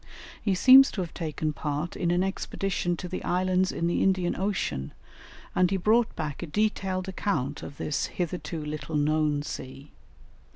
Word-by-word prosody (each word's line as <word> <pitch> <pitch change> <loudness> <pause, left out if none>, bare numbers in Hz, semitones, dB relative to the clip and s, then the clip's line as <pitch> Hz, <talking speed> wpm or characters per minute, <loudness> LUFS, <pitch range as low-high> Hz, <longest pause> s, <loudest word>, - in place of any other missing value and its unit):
He 200 -3 +1
seems 265 +7 +8
to 195 - -2
have 170 -2 -5
taken 155 -1 -3
part 150 +3 -3
in 175 - -1
an 175 +1 +2
expedition 190 -2 -2
to 180 - -5
the 185 - -5
islands 185 +1 +1
in 170 - -2
the 170 - +1
Indian 185 -2 +2
Ocean, 180 - -2 0.6
and 185 -1 +3
he 195 - 0
brought 225 +5 +2
back 150 -2 -4
a 175 - -4
detailed 190 0 -1
account 150 -8 -2
of 140 - -9
this 150 - -1
hitherto 170 -2 -4
little 150 0 -5
known 150 0 +1
sea. 135 0 -8
175 Hz, 165 wpm, -27 LUFS, 150-190 Hz, 0.6 s, seems